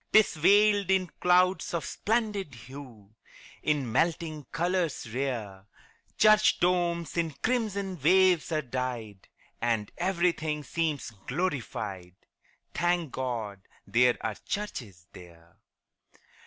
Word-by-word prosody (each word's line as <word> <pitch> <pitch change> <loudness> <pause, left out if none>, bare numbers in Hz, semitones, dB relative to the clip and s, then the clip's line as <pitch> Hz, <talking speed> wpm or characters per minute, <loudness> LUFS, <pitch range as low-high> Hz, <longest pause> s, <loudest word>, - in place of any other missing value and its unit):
'Tis 215 -1 +6
veiled 200 +4 +4
in 190 -1 +3
clouds 180 0 +3
of 160 -5 -2
splendid 210 - -1
hue, 115 -4 -12 0.5
In 145 -6 0
melting 160 +1 0
colors 170 -3 -1
rare: 110 -7 -3 0.5
Church 215 0 +5
domes 175 -2 0
in 170 -1 +1
crimson 200 - -1
waves 180 +1 +4
are 155 -1 0
dyed, 120 -6 -5 0.3
And 115 -3 0
everything 170 -4 0
seems 155 -5 -2 0.2
glorified 110 - -3 0.6
Thank 175 -2 0
God 115 -7 -4 0.2
there 125 +1 +3
are 110 -2 -3
churches 115 - -5
there! 85 -2 -15
155 Hz, 100 wpm, -28 LUFS, 120-180 Hz, 0.6 s, Tis